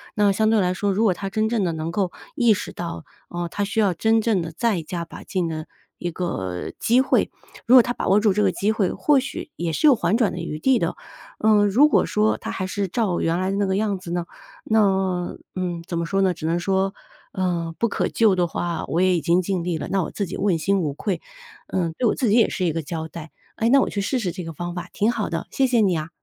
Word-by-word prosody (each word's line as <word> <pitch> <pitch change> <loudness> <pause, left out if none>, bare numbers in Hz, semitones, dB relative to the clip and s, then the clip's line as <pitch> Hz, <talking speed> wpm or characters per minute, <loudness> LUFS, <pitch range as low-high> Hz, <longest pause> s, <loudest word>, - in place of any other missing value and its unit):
那 205 -1 +4
相 215 +2 +2
对 225 - +4
来 180 -2 +1
说， 200 +2 -1
如 210 +4 +1
果 205 -5 +4
他 195 +2 -5
真 215 +3 0
正 230 -4 0
地 175 - 0
能 160 +1 -4
够 185 0 -1 0.2
意 240 -6 +4
识 200 - -5
到， 170 -1 -5 0.3
呃， 175 0 -3
他 205 - -2
需 205 +2 -2
要 200 -4 +3
真 220 +5 +2
正 215 -4 +1
地 165 -1 -5
再 200 +1 0
加 170 +1 -5
把 - - -11
劲 185 -3 -2
的 155 -1 -5 0.3
一 175 -1 -4
个 95 - -4
机 240 +3 +3
会。 265 - +1 0.3
如 245 - +6
果 255 - +10
他 240 - -2
把 - - -4
握 195 +2 +5
住 210 -2 +3
这 210 +2 +1
个 195 - +3
机 205 +4 0
会， 205 -4 0
或 290 -2 +3
许 260 -1 -6
也 170 -1 -2
是 305 - +3
有 275 - +7
缓 175 -1 +1
转 230 -4 +2
的 180 - -5
余 160 -2 -5
地 265 +7 +3
的。 - - -1 0.5
嗯， 210 -1 +5
如 255 +10 +5
果 - - +3
说 215 +1 +1
他 - - -6
还 185 - -3
是 195 +1 -2
照 190 -2 0
原 165 +2 0
来 185 +1 0
的 195 - -1
那 200 - +1
个 190 0 0
样 205 -1 0
子 180 -2 -8
呢， 175 -1 -1 0.4
那， 190 -4 +1 0.2
嗯， 175 -2 -3
怎 170 - -3
么 170 - -1
说 195 +3 0
呢， 190 -2 +3
只 160 - -8
能 165 +2 +1
说， 195 +1 0 0.4
呃， 170 -3 -1
不 235 - +2
可 - - 0
救 220 -4 +3
的 175 -1 +1
话， 170 +1 -3
我 170 - 0
也 185 -1 +4
已 - - -2
经 170 +2 +3
尽 185 -1 -2
力 175 -2 -1
了， 150 - -5
那 195 -2 +1
我 - - -5
自 200 - -2
己 185 - -6
问 190 -3 +1
心 195 +5 +1
无 150 -5 -1
愧， 190 +6 -3 0.5
嗯， 170 -3 -1
对 245 - +2
我 - - +2
自 250 -6 0
己 205 - +4
也 235 - +5
是 185 - -2
一 170 - +2
个 165 +1 -2
交 160 +1 -5
代。 160 -1 -9 0.2
哎， 225 - +1
那 275 +3 +6
我 - - 0
去 200 - -2
试 255 +6 -1
试 190 -6 -2
这 180 - -6
个 165 0 -7
方 175 +3 -5
法， 180 0 -6
挺 215 +3 +2
好 215 -4 -2
的。 165 0 -4
谢 270 - +1
谢 245 -2 +2
你 185 -5 +2
啊。 155 +1 -5
190 Hz, 290 characters per minute, -23 LUFS, 170-215 Hz, 0.5 s, 果